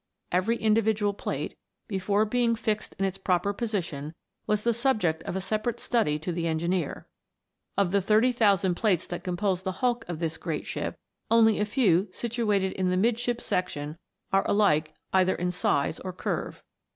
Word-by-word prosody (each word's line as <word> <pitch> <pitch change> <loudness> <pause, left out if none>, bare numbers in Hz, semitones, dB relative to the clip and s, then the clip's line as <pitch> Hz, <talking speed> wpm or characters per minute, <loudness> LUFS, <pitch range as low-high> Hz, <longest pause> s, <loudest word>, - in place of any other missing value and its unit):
Every 185 +6 +2
individual 215 -2 +2
plate, - - -4 0.3
before 200 +1 +1
being 235 +1 +2
fixed 215 -1 -2
in 195 - +1
its 195 0 -3
proper 190 +1 +1
position, 170 -9 -3 0.3
was 210 0 +1
the 235 - +3
subject 215 - +1
of - - -3
a 190 - -1
separate 215 +5 -2
study 185 -11 +1
to 160 +4 -4
the 170 0 -1
engineer. 170 0 -1 0.7
Of 195 -3 +2
the 200 0 +3
thirty 215 +6 +4
thousand 200 -6 +3
plates 185 -2 +1
that 175 - -6
com 180 -1 -3
pose 190 -3 0
the 190 0 -3
hulk 245 -2 +2
of 175 - -3
this 165 -1 -3
great - - -3
ship, - - -4 0.3
only 225 -2 +5
a 210 - +2
few 205 -4 +3
situated 210 -5 0
in 185 -1 -1
the 180 - +1
midship 235 +3 +1
section 155 -5 -2 0.4
are 195 - +4
alike 155 -7 +2 0.2
either 185 0 +4
in 180 +1 -1
size 150 -3 0
or 185 -1 -6
curve. - - -4
195 Hz, 175 wpm, -27 LUFS, 180-220 Hz, 0.7 s, only